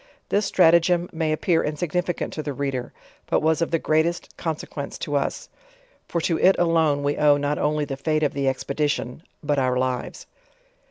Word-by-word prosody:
This 200 0 +1
strat 170 -3 +5
agem 175 +1 +2
may 160 -1 -1
appear 160 +2 +1
insignificant 175 +4 -2
to 155 - -3
the 145 -2 -4
reader, 135 -3 -3 0.4
but - - +1
was 160 +1 +2
of 165 - +1
the 165 - +1
greatest 160 +2 0
consequence 155 -3 -5
to 145 - -3
us; 140 - -2 0.6
for 170 - -1
to 165 0 0
it 190 - +5
alone 160 -4 +2
we 145 +1 0
owe 145 -1 +5
not 145 +1 -1
only 150 0 0
the 135 -1 -5
fate 155 +2 0
of 145 - +1
the 140 -1 -1
expedition, 140 -1 -2 0.2
but 145 -1 +1
our 130 -1 +1
lives. 130 -1 -3
150 Hz, 180 wpm, -23 LUFS, 140-165 Hz, 0.6 s, strat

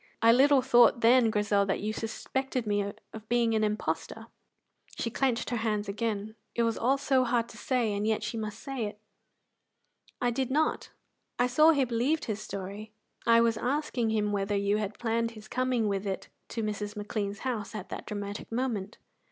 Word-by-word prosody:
"I 230 +1 +6
little 270 +2 +5
thought 240 -2 +5
then, 235 0 +6
Grizel, 205 -1 +2
that 195 - 0
you 215 +1 -2
suspected 255 +3 -3
me 205 -1 0 0.2
of 220 -1 -10
being 235 -1 +2
an 215 -1 +2
impostor." 210 0 -2 0.7
She 230 - -2
clenched 250 -1 0
her 240 - 0
hands 215 -2 -1
again; 215 0 -2 0.2
it 235 - +2
was 230 -1 +1
all 260 +4 +2
so 270 -2 +2
hard 235 -1 +1
to - - -12
say, 240 -5 0
and 205 +1 -1
yet 220 -1 +1
she 215 +2 -3
must 215 -1 -4
say 265 -3 -4
it! 205 - -8 1.2
"I 245 -1 +1
did 260 +1 -1
not. 305 +4 0 0.5
I 245 - +3
saw 305 +6 +5
he 285 -5 +4
believed 250 +7 0
his 215 -1 -3
story. 200 +1 -6 0.4
I 230 0 +6
was 230 -1 +2
asking 255 -3 -1
him 210 -1 +1
whether 200 0 0
you 200 +1 +1
had 210 -1 -3
planned 230 0 0
his 215 0 -11
coming 250 -2 0
with 200 0 -1
it 190 - -4 0.2
to 230 - -4
Mrs. 210 0 -3
McLean's 205 -1 -3
house 225 -5 -3
at 205 -3 -6
that - - -7
dramatic 205 0 -5
moment." 225 -4 -2
225 Hz, 185 wpm, -29 LUFS, 210-245 Hz, 1.2 s, I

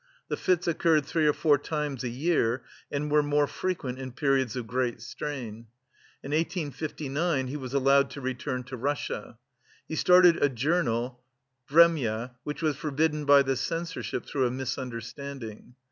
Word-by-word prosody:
The - - 0
fits 180 -1 +1
occurred 160 -3 +3
three 155 +1 +1
or - - +6
four 145 -2 +3
times 150 -3 -3
a 125 - -1
year 130 -2 +1 0.3
and 145 +1 -2
were 150 0 +5
more 145 0 +2
frequent 140 -6 -3
in 130 -2 -6
periods 135 -4 +1
of 125 -2 -3
great 125 +1 -1
strain. 120 -2 -6 0.6
In 140 - -6
1859 155 -2 -1
he 130 +3 -5
was 135 -2 -5
allowed 140 +1 +4
to 140 - -8
return 125 0 -3
to 125 +1 -7
Russia. 140 -2 -3 0.5
He 160 - -4
started 180 0 +6
a 145 - +4
journal 125 -3 0 0.5
"Vremya," 135 -8 +4
which 150 +2 -5
was 155 -3 +1
forbidden 150 +1 0
by 140 0 +7
the 135 0 0
Censorship 165 +6 -3
through 130 -3 0
a - - -1
misunderstanding. 125 -1 -6
140 Hz, 155 wpm, -28 LUFS, 125-155 Hz, 0.6 s, by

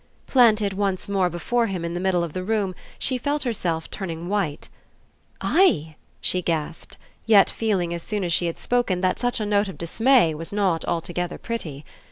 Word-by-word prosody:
Planted 220 -6 +4
once 195 -1 -1
more 195 -3 +1
before 230 +8 0
him 185 -4 -3
in 170 - -3
the 175 - -2
middle 180 -2 +1
of 165 -3 -5
the 185 - -3
room 205 -2 0 0.2
she 255 -2 -1
felt 290 +3 -1
herself 175 -10 -2
turning 170 -4 -5
white. 195 -8 -1 0.7
"I?" 160 - +3 0.2
she 180 - 0
gasped, 165 -1 -3 0.3
yet 210 -3 +6
feeling 190 -6 0
as 170 - -4
soon 210 +2 -3
as 175 -1 0
she 175 - +2
had 165 - -4
spoken 240 -7 0
that 185 -1 +1
such 245 -1 0
a 215 - -1
note 205 0 +2
of 190 - -8
dismay 225 +1 +3
was 165 +2 -7
not 190 -5 +1
altogether 175 +1 -2
pretty. 155 -12 -5
190 Hz, 185 wpm, -24 LUFS, 170-220 Hz, 0.7 s, yet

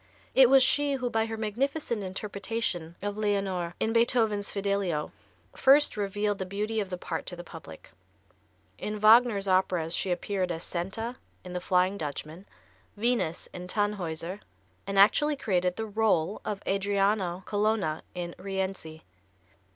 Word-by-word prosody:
It 260 -2 +7
was 270 -1 +7
she 285 +2 +3
who 255 -3 -2
by 225 0 +1
her 225 0 -4
magnificent 235 +2 -2
interpretation 195 -3 -3
of 205 +1 -3
Leonore, 195 -4 -1
in 220 - 0
Beethoven's 225 -3 +2
"Fidelio," 200 -6 -1 0.4
first 285 +2 +5
revealed 205 0 -1
the 190 - -2
beauty 210 +3 -2
of 200 -3 -2
the 180 - -4
part 165 -2 -5
to 180 - -4
the 175 - -8
public. 160 - -12 0.9
In 210 0 -3
Wagner's 215 -2 +5
operas 185 -3 +1
she 190 - -1
appeared 180 +1 -1
as 165 0 -4
Senta, 225 +8 -4 0.3
in 180 - -8
the 180 - -3
"Flying 185 +2 +2
Dutchman"; 155 +5 -6 0.5
Venus, 230 -7 0
in 180 0 -7
"Tannhäuser," 185 -3 -2 0.5
and 195 0 -2
actually 295 +9 +5
created 180 -8 0
the 220 0 -4
rôle 210 -4 +1
of 205 -1 -4
Adriano 195 -2 0
Colonna, 205 -6 0
in 175 -1 -4
"Rienzi." 190 -5 -4
200 Hz, 145 wpm, -28 LUFS, 180-220 Hz, 0.9 s, It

